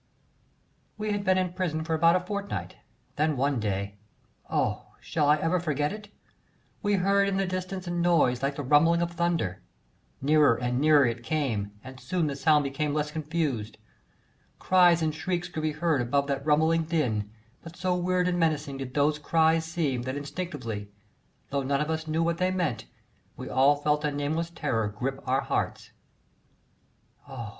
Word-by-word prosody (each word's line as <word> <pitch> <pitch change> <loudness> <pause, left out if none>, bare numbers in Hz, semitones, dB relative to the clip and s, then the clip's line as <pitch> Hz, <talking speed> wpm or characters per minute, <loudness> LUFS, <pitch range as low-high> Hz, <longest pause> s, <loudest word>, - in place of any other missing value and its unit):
We 215 0 -2
had 205 -1 -1
been 185 -1 +3
in 185 -1 -1
prison 170 -4 -2
for 160 0 -2
about 165 +2 +4
a - - +3
fortnight, 200 +2 -5 0.4
then 150 -1 +1
one 140 0 +1
day 100 -1 -3 0.5
oh! - - -1
shall 150 -3 0
I 150 - +7
ever 165 +4 +1
forget 150 0 -1
it? 210 -1 -9 0.7
we 205 -1 +2
heard 200 +1 +3
in 195 -1 0
the 195 - +1
distance 185 0 -4
a 175 - -4
noise 170 -8 +2
like 140 +1 -1
the 145 - -4
rumbling 165 +5 +4
of 170 - -3
thunder; 170 - -1 0.6
nearer 150 -2 +4
and 125 +1 -1
nearer 150 -2 +6
it 120 0 -2
came, 115 -7 -2
and 130 0 -10
soon 165 +7 -1
the 145 -2 -2
sound 150 +1 +3
became 145 +2 -2
less 150 0 -1
confused. 150 -8 -2 0.8
Cries 175 -3 +4
and 155 -1 0
shrieks 175 +2 -2
could 160 - -4
be 155 -1 -1
heard 155 -3 +1
above 140 +4 +1
that 140 -1 -2
rumbling 160 +2 +3
din, 125 -11 -1 0.3
but 165 0 -11
so 180 0 0
weird 180 0 +1
and 175 -1 0
menacing 150 -4 0
did 130 -1 -7
those 150 +1 +2
cries 160 +1 +2
seem, 155 -7 -1
that 130 +3 -4
instinctively 140 - -5 0.6
though 140 0 0
none 140 +1 0
of 150 +1 -1
us 160 0 -3
knew 160 +1 0
what 170 0 -1
they 185 0 +2
meant 170 -12 -2 0.5
we - - -7
all 135 +3 +4
felt 150 +1 0
a 150 - +1
nameless 150 +4 -2
terror 115 -10 -1
grip 130 +6 -4
our 130 +1 +2
hearts. - - -3 1.4
Oh! 120 -5 -6
155 Hz, 175 wpm, -27 LUFS, 135-170 Hz, 1.4 s, I